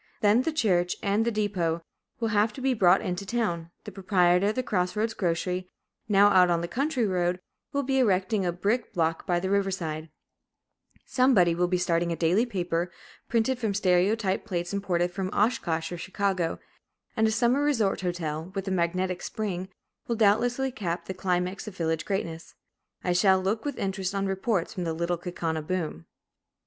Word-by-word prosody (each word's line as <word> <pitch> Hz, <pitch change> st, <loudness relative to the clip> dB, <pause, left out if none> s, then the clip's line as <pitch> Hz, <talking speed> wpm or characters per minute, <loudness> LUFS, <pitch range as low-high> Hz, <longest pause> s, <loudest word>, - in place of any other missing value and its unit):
Then, 210 Hz, +3 st, +5 dB
the 325 Hz, -, -1 dB
church 180 Hz, -, +1 dB
and 205 Hz, +3 st, +2 dB
the 235 Hz, -, +1 dB
depot 185 Hz, -6 st, -1 dB, 0.4 s
will 225 Hz, -1 st, 0 dB
have 210 Hz, +1 st, +2 dB
to -, -, -9 dB
be 265 Hz, 0 st, +2 dB
brought 190 Hz, -4 st, +4 dB
into 180 Hz, +1 st, -3 dB
town; 195 Hz, -7 st, -2 dB
the -, -, -8 dB
proprietor 185 Hz, -1 st, +3 dB
of 210 Hz, -, 0 dB
the 255 Hz, -, 0 dB
cross 180 Hz, -5 st, -1 dB
roads 220 Hz, +2 st, 0 dB
grocery, 180 Hz, -1 st, -1 dB, 0.4 s
now 205 Hz, 0 st, +6 dB
out 185 Hz, -3 st, +5 dB
on 170 Hz, -1 st, +2 dB
the 170 Hz, -, -3 dB
"country 270 Hz, -, 0 dB
road," 180 Hz, -2 st, 0 dB, 0.3 s
will 280 Hz, -1 st, 0 dB
be 265 Hz, 0 st, +1 dB
erecting 195 Hz, -3 st, +2 dB
a 175 Hz, -, +1 dB
brick 210 Hz, +7 st, -1 dB
"block" 165 Hz, 0 st, 0 dB
by 175 Hz, -2 st, +2 dB
the 190 Hz, +2 st, -2 dB
river 200 Hz, -1 st, +2 dB
side; 160 Hz, -4 st, -4 dB, 1.0 s
somebody 240 Hz, -10 st, +4 dB
will 175 Hz, +1 st, +1 dB
be 180 Hz, 0 st, +1 dB
starting 170 Hz, -1 st, +1 dB
a -, -, 0 dB
daily 180 Hz, +9 st, +2 dB
paper, 175 Hz, -4 st, -2 dB, 0.4 s
printed 235 Hz, +2 st, +1 dB
from 215 Hz, -5 st, -1 dB
stereotype 190 Hz, +2 st, +2 dB
plates 175 Hz, -4 st, -3 dB
imported 180 Hz, -3 st, 0 dB
from 190 Hz, 0 st, -3 dB
Oshkosh 190 Hz, -8 st, 0 dB
or 175 Hz, -, -5 dB
Chicago; 190 Hz, -2 st, -1 dB, 0.6 s
and 220 Hz, 0 st, +3 dB
a -, -, +1 dB
summer 245 Hz, +5 st, +2 dB
resort 235 Hz, -11 st, +1 dB
hotel 170 Hz, -2 st, -3 dB
with 195 Hz, 0 st, -3 dB
a -, -, -1 dB
magnetic 185 Hz, 0 st, 0 dB
spring, 190 Hz, -4 st, -4 dB, 0.4 s
will 235 Hz, -, 0 dB
doubtless 230 Hz, +3 st, +3 dB, 0.2 s
cap 170 Hz, -6 st, -3 dB
the 190 Hz, -, -4 dB
climax 185 Hz, +1 st, -2 dB
of 200 Hz, -2 st, -8 dB
village 160 Hz, -1 st, -1 dB
greatness. 170 Hz, -5 st, -4 dB, 0.5 s
I 180 Hz, -, +1 dB
shall 190 Hz, +1 st, +4 dB
look 205 Hz, +6 st, -1 dB
with 285 Hz, -3 st, -3 dB
interest 195 Hz, 0 st, -2 dB
on 195 Hz, 0 st, 0 dB
reports 195 Hz, 0 st, -1 dB
from 185 Hz, -4 st, -4 dB
the 165 Hz, -1 st, -1 dB
Little 170 Hz, +1 st, -1 dB
Kaukauna 165 Hz, -2 st, -3 dB
boom. 155 Hz, -, -4 dB
190 Hz, 180 wpm, -27 LUFS, 175-215 Hz, 1.0 s, now